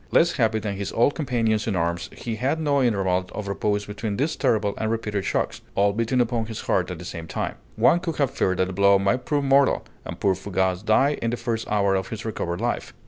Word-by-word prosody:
Less 170 - +4
happy 110 -4 +2
than 105 -2 -3
his 100 -1 -4
old 120 +5 +3
companions 115 -7 0
in 105 - 0
arms, 85 0 -1
he 115 -2 -5
had 135 +7 0
no 145 -3 +2
interval 95 -6 +1
of 105 -2 -5
repose 105 +1 -1
between 105 0 -4
these 150 +4 0
terrible 110 -6 +1
and 110 - -1
repeated 105 -3 -2
shocks, - - -1
all 100 0 +3
beating 115 +4 0
upon 120 -2 0
his 110 -1 -6
heart 90 0 0
at 90 - -5
the 90 - -9
same 85 -2 -6
time. - - -3 0.2
One 175 - +4
could 170 -2 -3
have 140 -3 +1
feared 95 -1 0
that 95 - +2
the 95 - -6
blow 100 +1 +5
might 100 +6 0
prove 145 -1 0
mortal, 135 0 +3 0.2
and - - -7
poor 100 - +3
Fougas 95 0 -1
die 130 +7 +3
in 115 - 0
the 120 - -2
first 115 -2 -3
hour 100 -2 +2
of 95 -1 -1
his 110 0 -6
recovered 90 -5 -3
life. 120 +2 -2
110 Hz, 235 wpm, -24 LUFS, 100-120 Hz, 0.2 s, blow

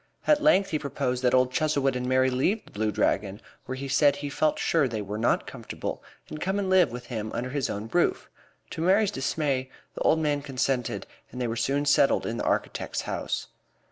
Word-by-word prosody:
At 300 -1 +4
length 200 -11 +4
he 155 - 0
proposed 130 -3 -2
that 125 0 +3
old 130 0 +3
Chuzzlewit 140 -2 +1
and 125 0 -2
Mary 130 0 +3
leave 180 - 0
The - - -17
Blue 110 +1 -1
Dragon, 100 -1 0 0.3
where 130 - -3
he 135 +1 -5
said 140 +1 +4
he 145 0 -5
felt 155 +1 +1
sure 155 -5 +2
they 115 -3 -4
were 105 +2 -5
not 115 - +1
comfortable, - - -6 0.3
and 155 - -8
come 190 +2 0
and 195 -2 -1
live 185 -6 +5
with 125 +1 -7
him 110 -3 -4
under 125 +2 -3
his 140 -2 -1
own 105 +2 -4
roof. 175 - +1 0.4
To - - -5
Mary's 195 +4 +3
dismay, 135 -1 -1 0.2
the - - -8
old 160 - +4
man 150 -2 0
consented, 130 -3 -1 0.3
and 125 - -7
they 125 - 0
were 115 - -2
soon 135 +5 0
settled 140 -1 +3
in 115 - -3
the - - -3
architect's - - -1
house. - - -3
135 Hz, 210 wpm, -27 LUFS, 125-155 Hz, 0.4 s, live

